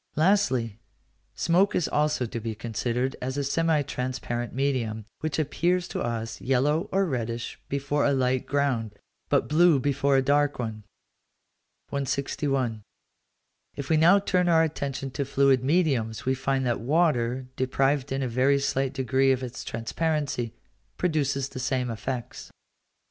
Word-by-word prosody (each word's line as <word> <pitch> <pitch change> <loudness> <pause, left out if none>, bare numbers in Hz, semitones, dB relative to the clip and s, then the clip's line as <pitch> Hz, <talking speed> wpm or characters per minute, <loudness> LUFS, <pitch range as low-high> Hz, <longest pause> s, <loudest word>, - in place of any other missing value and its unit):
Lastly, 130 - +2 0.6
smoke 180 +4 +2
is 175 - +1
also 150 -4 +1
to 115 0 -5
be 110 -1 -4
considered 120 +4 -2
as 130 +2 -3
a 140 - 0
semi 160 +1 +1
transparent 125 -3 -3
medium, 120 -6 -1
which 155 -2 -2
appears 175 +4 0
to - - -3
us 115 -1 -3
yellow 140 +5 +1
or 195 +1 +2
reddish 120 -6 -3
before 140 +1 0
a 145 - +3
light 130 -1 +1
ground, 130 -7 0 0.3
but - - +2
blue 160 -1 +5
before 140 +1 +2
a 135 - +3
dark 145 +1 +2
one. 110 -3 -5 1.0
161. 135 -3 -1 0.9
If 140 +2 -5
we - - +5
now 170 +5 +6
turn 180 -3 +1
our 165 -1 +5
attention 140 -4 -3
to 140 +2 -2
fluid 135 -1 +3
mediums, 135 -8 +1
we 130 - +2
find 135 0 -1
that 120 -1 0
water, 130 -3 +1
deprived 135 +1 0
in 135 0 -1
a - - 0
very 130 +4 +3
slight 135 -1 0
degree 130 +1 +2
of 130 0 0
its 125 0 -6
transparency, 135 0 -2 0.4
produces 140 -6 0
the 130 - -7
same 125 -1 -1
effects. 120 +1 -5
135 Hz, 145 wpm, -26 LUFS, 125-150 Hz, 1.0 s, now